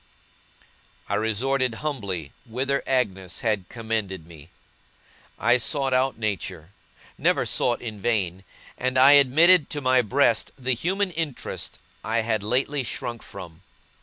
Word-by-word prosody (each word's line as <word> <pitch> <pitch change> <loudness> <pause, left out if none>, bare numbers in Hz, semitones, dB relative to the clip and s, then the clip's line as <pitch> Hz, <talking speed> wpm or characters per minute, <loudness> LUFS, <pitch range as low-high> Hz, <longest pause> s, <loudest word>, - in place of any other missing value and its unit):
I - - -3
resorted 125 +3 0
humbly 100 - -3
whither 135 +4 -1
Agnes 95 -9 -1
had 105 -5 -1
commended 110 -7 -3
me; 80 -2 -14 0.9
I 120 +3 +3
sought 135 +2 0
out 130 +1 +1
Nature, 100 -6 -4 0.5
never - - +2
sought 120 - +1
in 110 -3 -6
vain; 95 -4 -1 0.4
and 130 +1 0
I 135 +2 +8
admitted 145 +4 +6
to 150 - -3
my 130 -2 +3
breast 120 0 +2
the 130 0 0
human 185 - -1
interest 160 -5 -4 0.3
I 115 +1 0
had 110 -1 -1
lately 130 +6 0
shrunk 120 -1 -5
from. 90 -3 -11
120 Hz, 130 wpm, -24 LUFS, 105-135 Hz, 0.9 s, I